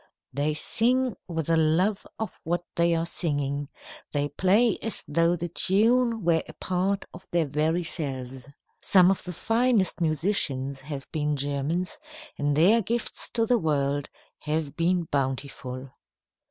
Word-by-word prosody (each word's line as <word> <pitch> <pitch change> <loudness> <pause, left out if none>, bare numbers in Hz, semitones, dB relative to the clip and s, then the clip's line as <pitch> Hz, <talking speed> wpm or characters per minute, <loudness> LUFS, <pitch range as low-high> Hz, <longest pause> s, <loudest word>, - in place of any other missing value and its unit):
They 145 +3 0
sing 245 +7 +2
with 165 -4 -3
a 165 - +3
love 170 +6 +2
of 220 - -5
what 175 +2 -1
they 170 0 +3
are 165 0 0
singing, 145 -4 -2 0.4
they 145 0 0
play 205 +6 +3
as 225 - -5
though 165 +3 +2
the 175 0 -4
tune 225 +6 +2
were 165 -1 +3
a - - -9
part 190 +2 -1
of 175 +2 -12
their 170 -2 +1
very 155 +4 0
selves. 135 -5 -4 0.3
Some 185 -1 +5
of 195 - -1
the 180 - -6
finest 225 0 +1
musicians 145 -5 +1
have 140 -1 -6
been 150 -2 0
Germans, 145 +6 -2 0.4
and 145 0 0
their 205 +9 +5
gifts 230 +3 -3
to 230 -1 +3
the 240 +1 +3
world 145 -3 0 0.3
have 155 -1 -2
been 175 +1 +1
bountiful. 135 -2 -3
165 Hz, 145 wpm, -26 LUFS, 145-190 Hz, 0.4 s, Some